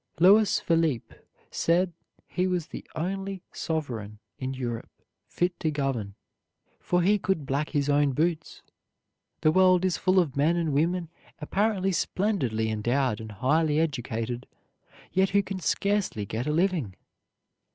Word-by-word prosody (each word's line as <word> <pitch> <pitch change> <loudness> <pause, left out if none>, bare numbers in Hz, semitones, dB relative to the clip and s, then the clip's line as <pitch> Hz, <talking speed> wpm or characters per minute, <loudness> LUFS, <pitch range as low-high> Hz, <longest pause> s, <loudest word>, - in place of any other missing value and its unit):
Louis 205 +4 +6
Philippe 165 -8 0 0.4
said 175 +1 +1 0.3
he 185 0 -1
was 180 -3 -1
the - - -7
only 195 +3 -3
sovereign 120 - -4 0.2
in 130 0 -3
Europe 120 -3 -4 0.4
fit 175 0 -1
to 160 - 0
govern, 135 -9 -2 0.6
for 180 0 +1
he 205 +3 +3
could 185 -6 -1
black 140 +3 -1
his 145 -3 0
own 145 -1 +3
boots. 160 +3 -1 0.8
The 155 - +4
world 185 +1 +5
is 185 - +1
full 185 0 +2
of 155 -7 0
men 150 +5 +3
and 165 -4 0
women 170 +3 +1 0.3
apparently 195 +4 0
splendidly 135 - 0
endowed 120 +1 0
and 110 -1 -8
highly 150 +8 +2
educated, 120 -5 -2 0.7
yet 190 0 +3
who 200 +1 +3
can 190 0 -5
scarcely 200 - 0
get 110 +6 -3
a - - +1
living. 165 - 0
160 Hz, 140 wpm, -27 LUFS, 130-185 Hz, 0.8 s, Louis